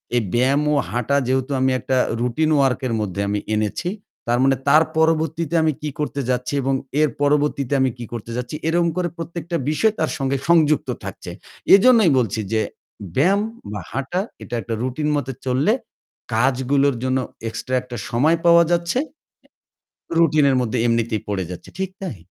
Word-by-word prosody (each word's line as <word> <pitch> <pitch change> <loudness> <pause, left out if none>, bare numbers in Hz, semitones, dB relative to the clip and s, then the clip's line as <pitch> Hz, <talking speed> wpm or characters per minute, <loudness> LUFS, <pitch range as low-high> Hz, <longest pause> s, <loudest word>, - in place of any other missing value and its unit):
এই 120 - +3
ব্যায়াম 130 +4 +3
ও - - +2 0.2
হাঁটা 125 +4 0
যেহেতু 130 +1 0
আমি 130 0 +2
একটা 130 - -1 0.2
রুটিন 140 +6 +1
ওয়ার্ক 135 -2 +2
এর 115 - -2
মধ্যে 100 -1 -2
আমি 105 0 0 0.2
এনেছি। 110 - -1 0.4
তার 120 +1 +2
মানে 135 0 +4
তার 155 +3 +6
পরবর্তীতে 160 0 +1
আমি 155 -1 +2
কি 150 - -3
করতে 145 -1 -2
যাচ্ছি 125 +2 -1
এবং 135 +1 0 0.3
এর 155 - +4
পরবর্তীতে 145 -2 +1
আমি 130 - +3
কি 120 - -6
করতে 115 0 -6
যাচ্ছি 125 +4 -4
এরকম 170 0 +2
করে 180 -1 +1
প্রত্যেকটা 170 0 -5
বিষয় 215 +8 +2
তার 160 - 0
সঙ্গে 135 0 0
সংযুক্ত 155 -3 +3
থাকছে। - - -7 0.4
এজন্যই 220 - +5
বলছি 115 -2 -1
যে 110 - +2 0.5
ব্যায়াম 190 +9 +3 0.3
বা 105 - -4
হাঁটা 135 - -2 0.2
এটা 120 - -5
একটা 115 - -5
রুটিন 150 +4 -2
মত 145 -3 -2 0.2
চললে 135 - +2 0.6
কাজগুলোর 135 +3 +2
জন্য 130 0 +1 0.3
এক্সট্রা 130 +3 -3
একটা 125 -1 -8
সময় 150 +8 +3
পাওয়া 170 0 +7
যাচ্ছে। 170 +8 +1 1.2
রুটিনের 150 -4 +4
মধ্যে 125 0 -1
এমনিতেই 115 -2 0
পড়ে 95 -2 -1
যাচ্ছে, 90 - -9
ঠিক 190 - -1
তাই। 175 - -5
140 Hz, 165 wpm, -21 LUFS, 125-160 Hz, 1.2 s, পাওয়া